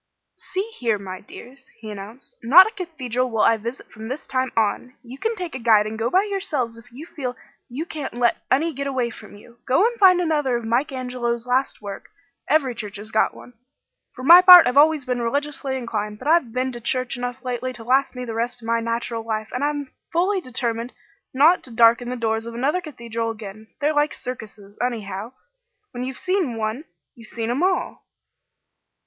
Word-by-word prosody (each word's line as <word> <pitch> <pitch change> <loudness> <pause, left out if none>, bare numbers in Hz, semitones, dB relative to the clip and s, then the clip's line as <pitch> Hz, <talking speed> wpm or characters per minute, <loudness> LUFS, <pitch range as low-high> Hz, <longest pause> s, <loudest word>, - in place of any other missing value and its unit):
"See 380 - 0 0.2
here, 230 -4 +1
my 185 -2 -8
dears," 265 +5 -13
he 220 -1 -8
announced, 210 +6 -10
"Not 315 +11 +8
a 440 - -4
cathedral 260 - -3
will 225 -2 +1
I 230 - +5
visit 235 +4 -7
from 220 0 -9
this 265 +5 -5
time 260 -1 -1
on! 225 +4 0
You 255 +3 -11
can 450 +1 -1
take 360 -5 -6
a 260 - -5
guide 220 -3 +4
and 215 +1 -5
go 230 +1 0
by 375 +8 +3
yourselves 345 - -2
if 230 +2 -16
you 275 +7 -10
feel 255 -7 -5 0.3
you 275 +7 -4
can't 300 -7 -6
let 240 -1 +2
any 310 +6 +2
get 280 +1 -4
away 255 -3 -1
from 215 -2 -12
you. 235 +3 -17
Go 265 +10 +4
and 475 0 -1
find 370 -2 +7
another 295 -7 +1
of 235 - -7
Mike 250 +7 0
Angelo's 250 -2 -3
last 250 -2 0
work; 200 -1 -8 0.4
every 275 -4 +2
church 210 -3 -7
has 215 +2 -9
got 220 - +2
one. 245 - -13 0.6
For 255 - -9
my 345 +6 +10
part, 360 -2 +10
I've 245 - 0
always 300 -1 +5
been 250 -2 -2
religiously 280 +2 -2
inclined, 210 -4 -4
but 255 - -8
I've 310 -7 +3
been 255 +2 -1
to 240 -1 -9
church 255 +2 -1
enough 245 +2 -5
lately 250 +1 -3
to 230 - -9
last 265 +3 +2
me 250 0 -5
the 230 - -5
rest 240 +1 -3
of - - -8
my 230 0 +2
natural 230 0 -3
life, 220 -1 -4
and 250 +3 -3
I've 290 -2 -2 0.2
fully 370 +3 +1
determined 240 -3 -3 0.4
not 305 +7 +5
to - - -7
darken 230 +1 +4
the 250 - -3
doors 225 -1 -1
of 235 - -7
another 285 +9 0
cathedral 235 -7 -5
again. 215 -1 -8
They're 300 +1 +1
like 295 0 +1
circuses, 210 -4 -8
anyhow; 220 -2 -4 0.6
when 245 -2 -5
you've 260 0 -5
seen 365 - -1
one, 220 +7 -3 0.3
you've 230 -4 -13
seen 230 0 -3
'em 260 +5 -1
all." 370 0 -1
250 Hz, 205 wpm, -22 LUFS, 230-285 Hz, 0.6 s, my